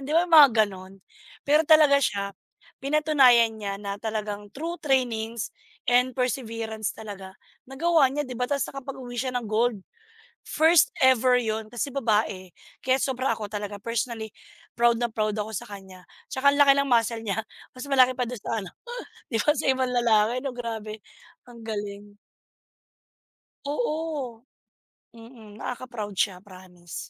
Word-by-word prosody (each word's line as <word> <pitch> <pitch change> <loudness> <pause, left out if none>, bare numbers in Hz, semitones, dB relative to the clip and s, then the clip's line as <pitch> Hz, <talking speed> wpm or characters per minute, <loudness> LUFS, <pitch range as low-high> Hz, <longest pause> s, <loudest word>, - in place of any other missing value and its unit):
'di 295 - -3
ba 345 - +5
mga 305 -4 +9 0.2
ganon? 190 0 -11 0.5
Pero 300 +2 +5
talaga 305 -3 +6
siya, 200 -3 -1 0.5
pinatunayan 275 -6 +4
niya 200 -2 -4
na 200 -1 -4
talagang 210 -2 -4
through 335 +5 -5
trainings 235 -6 -1 0.4
and 250 +1 +3
perseverance 230 -4 -2
talaga 195 -3 -9 0.3
nagawa 285 +1 +2
niya, 295 +2 -2
'di 255 - -7
ba? 250 - 0
Tapos 280 -1 0
nakapaguwi 260 -2 -8
siya 255 +1 -2
ng 240 -2 -3
gold. 225 0 +1 0.7
First 320 +1 +4
ever 255 -1 +5
'yun, 220 -2 -3
kasi 240 +4 -3
babae, 210 -7 0 0.3
kaya 260 0 +3
sobra 265 0 -1
ako 215 -1 -6
talaga 205 -1 -5
personally 230 -1 -3 0.5
proud 235 -1 +3
na 240 - +1
proud 215 -1 -1
ako 215 +1 -4
sa - - -4
kanya, 190 -2 -11 0.2
At - - -54
saka 280 - +7
ang 285 - -1
laki 280 -1 +8
ng 280 0 +1
muscle 230 -1 +2
niya, 220 0 -2 0.4
mas 255 - -7
malaki 255 -2 +5
pa 250 - 0
dun 245 -3 -6
sa 225 - -2
ano 185 - -9 0.6
'di 225 - 0
ba, - - +3
sa - - -2
ibang 260 -1 0
lalaki 235 -1 +2
'no, 270 -1 -4
grabe 220 -3 -6 0.5
ang 235 -1 -13
galing. 205 -1 -6 1.5
Oo. 295 - -3 0.7
Mm. 225 -2 -14
Nakaka 250 +3 -6
proud 215 -4 -6
siya 185 -3 0
promise. 185 -3 -13
235 Hz, 155 wpm, -25 LUFS, 215-265 Hz, 1.5 s, mga